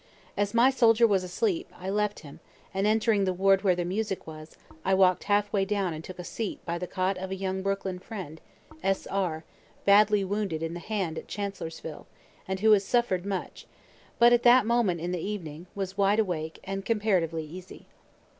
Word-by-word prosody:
As 205 +2 -1
my 245 +3 +6
soldier 235 -3 +5
was 195 -4 +2
asleep, 350 - -1
I 185 +1 -4
left 210 0 -1
him, 145 -3 -12 0.3
and 195 +2 +1
entering 215 -1 +2
the 185 -1 -1
ward 195 +1 +4
where 185 -3 +3
the 175 0 -2
music 195 +2 -2
was, 155 0 -11 0.3
I 190 - +2
walk'd 185 -1 +3
halfway 205 -1 +2
down 195 -3 -1
and 155 +1 -7
took 185 - -9
a 180 - -6
seat 215 +4 -4
by 170 0 -2
the 180 - -4
cot 185 +1 -1
of 190 0 -5
a 190 - -3
young 190 0 -3
Brooklyn 195 -1 -2
friend, 185 -7 -8 0.4
S. 195 0 0
R., 175 -5 -2 0.4
badly 205 0 +5
wounded 195 -5 -2
in 165 0 -3
the 175 - -5
hand 185 -5 -3
at - - -13
Chancellorsville, 165 -6 -6 0.4
and 190 0 -3
who 220 0 +5
has 205 -2 +5
suffer'd 195 -4 0
much, 195 -2 -5 0.5
but 240 +1 +6
at 240 - +4
that 245 -1 +6
moment 220 -8 +1
in 175 +1 -2
the 180 - -2
evening 175 -5 -6
was 195 0 -4
wide 200 +1 +4
awake 165 -7 -1
and 195 0 -4
comparatively 185 -8 0
easy. 180 +4 -11
195 Hz, 190 wpm, -28 LUFS, 180-210 Hz, 0.5 s, my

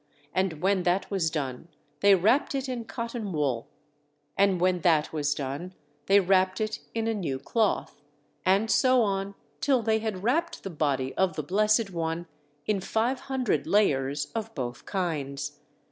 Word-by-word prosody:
And 180 -4 -1
when 195 0 +3
that 180 +4 0
was 185 -5 +1
done 140 -2 -4 0.3
they 200 -1 +6
wrapped 225 +11 +2
it 270 0 -2
in 245 -3 -4
cotton 230 -3 -4
wool. 140 -7 -1 0.7
And 195 -2 +3
when 180 0 +2
that 160 -3 +3
was 145 -2 0
done, 145 +7 -5 0.3
they 200 +1 +6
wrapped 185 0 +2
it 215 0 -2 0.2
in 225 0 0
a 225 - +1
new 165 -11 -2
cloth, 220 - -1 0.4
and 200 +4 +3
so 255 -2 +4
on 195 -1 -2 0.2
till 260 - +2
they 220 0 +2
had 215 -4 -4
wrapped 330 +9 0
the 195 - -5
body 140 -4 -1
of 185 -4 +1
the 155 - -3
Blessed 210 - +2
One 165 0 -2 0.4
in 205 -3 0
five 230 +7 0
hundred 265 -3 -1
layers 145 -8 +1
of 225 0 -4
both 125 -4 -5
kinds. 145 -6 -3
190 Hz, 160 wpm, -27 LUFS, 155-220 Hz, 0.7 s, they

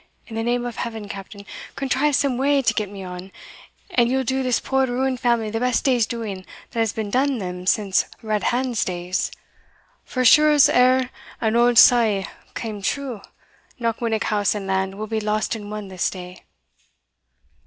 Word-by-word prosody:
In 225 - -9
the 225 - -1
name 240 +1 0
of 240 -2 -5
Heaven, 225 -3 -5
Captain, 200 +1 -9 0.3
contrive 275 +2 +1
some 270 -1 +1
way 280 0 +2
to - - +2
get 210 -3 -2
me 195 -1 -8
on, 180 +1 -8 0.6
and 240 -8 +3
ye'll 265 +1 +1
do 265 +2 -1
this 255 -2 +1
poor 265 0 +1
ruined 255 +1 -1
family 235 -3 +1
the 225 - -2
best 250 0 +1
day's 245 -5 +3
doing 215 -5 -5 0.3
that 230 - -4
has 225 -2 +2
been 215 -2 -4
done 270 +2 +1
them 180 -3 -6
since 195 -2 +2 0.2
Redhand's 235 +3 0
days 180 0 -2 0.7
for 255 - -3
as 255 - +5
sure 305 +6 +7
as 295 -2 +6
e'er 255 +1 +3 0.3
an 220 0 0
auld 240 0 +4
saw 225 -6 +6 0.3
came 215 -3 -5
true, 250 +1 -3 0.6
Knockwinnock 230 -1 -1
house 205 -1 +1
and 205 -2 -4
land 190 0 -1
will 215 +2 -5
be 220 0 -2
lost 215 +1 -1
and 210 -2 -6
won 210 -1 -6
this 185 -2 -1
day." 180 -1 -10
225 Hz, 180 wpm, -22 LUFS, 205-250 Hz, 0.7 s, sure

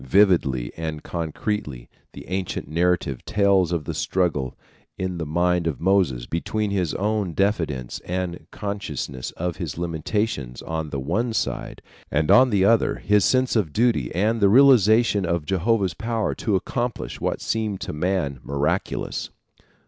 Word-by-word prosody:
Vividly 70 -6 +3
and 80 -2 -5
concretely 80 - -4 0.3
the - - -10
ancient 95 -4 -3
narrative 85 -4 0
tells 100 -4 +2
of 85 -4 -1
the - - -3
struggle 80 -9 -1 0.4
in 95 -2 -3
the 80 - -3
mind 85 +2 +1
of 75 -6 -2
Moses 90 -10 +2
between 105 - -2
his 90 -6 -1
own 105 -3 -1
diffidence 80 - -1
and 90 -1 -4
consciousness 80 - -4
of 90 0 -2
his 85 -6 -5
limitations 85 - -2
on 80 -1 -3
the 70 - -3
one 105 - -1
side - - -3 0.3
and 75 0 +1
on 130 +1 +7
the 100 -4 +3
other 115 +1 +3
his 105 -1 +2
sense 130 +11 +2
of 100 -9 +1
duty 110 - +2
and 110 +5 +1
the 100 - +6
realization 115 -4 +5
of 85 -3 -1
Jehovah's 95 +1 +1
power 115 -2 -1
to 105 - -1
accomplish 120 +5 -3
what - - -1
seemed 110 -3 -2
to - - -4
man 75 -4 -1
miraculous. 75 +6 -2
90 Hz, 150 wpm, -23 LUFS, 80-105 Hz, 0.4 s, on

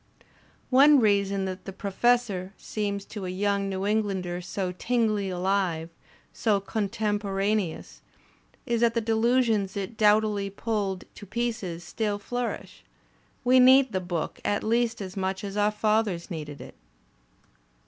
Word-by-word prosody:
One 280 +3 +7
reason 200 -3 +2
that 185 0 -6
"The 195 - -5
Professor" 200 -1 0
seems 200 -2 -3
to 200 -4 -6
a - - -3
yoimg 200 +1 0
New 190 0 -3
Englander 195 -4 -1
so 185 +1 -3
tinglingly 215 0 0
alive, 180 -3 0 0.4
so 210 -3 +1
contemporaneous, 205 -2 -2 0.6
is 235 -1 0
that 235 0 +3
the - - +3
delusions 225 -3 +1
it 200 +3 -5
doughtily 210 -1 +3
pulled 200 -2 -2
to 205 - -11
pieces 220 -6 -3
still 205 +3 -2
flourish; 245 +4 -5 0.6
we 255 +1 +5
need 260 0 +6
the 185 - -1
book 175 -3 -4
at 205 - 0
least 230 0 +1
as 190 -1 -6
much 190 0 -2
as 200 -1 -5
our 210 0 +3
fathers 210 -4 0
needed 150 -3 -6
it. - - -10
205 Hz, 135 wpm, -27 LUFS, 190-225 Hz, 0.6 s, One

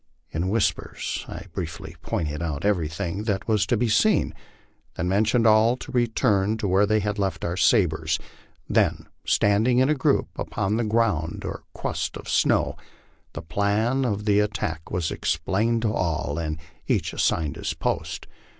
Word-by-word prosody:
In 85 +4 -1
whispers 110 0 -1
I - - -7
briefly - - -6
pointed 75 -1 -2
out 80 -1 -3
everything 90 +1 -1
that 100 -3 -1
was 110 -3 +2
to 120 - +2
be 120 +2 +1
seen, 205 - +3 0.6
then 90 - -2
motioned 110 +4 +2
all 110 +3 +5
to 135 - -9
return 110 -4 +2
to 110 -2 -2
where 95 +2 +3
we 110 +1 +2
had 105 +1 -2
left 95 -4 -1
our 85 - -1
sabres; 80 -7 +2 0.5
then, - - +1 0.2
standing 110 +5 +3
in 130 +2 +4
a - - +5
group 135 - +1
upon 105 +1 -1
the 120 - +1
ground 105 -8 0
or - - -6
crust - - -3
of - - -11
snow, - - +2 0.6
the - - -6
plan 105 +9 +1
of 105 -4 -1
the 105 -1 +4
attack 105 -7 -2
was 85 -3 -1
explained 110 +8 0
to 110 -2 +1
all 80 -3 -1
and 75 -1 -3 0.3
each - - 0
assigned 75 -3 0
his - - -3
part. - - -2
105 Hz, 160 wpm, -25 LUFS, 85-110 Hz, 0.6 s, all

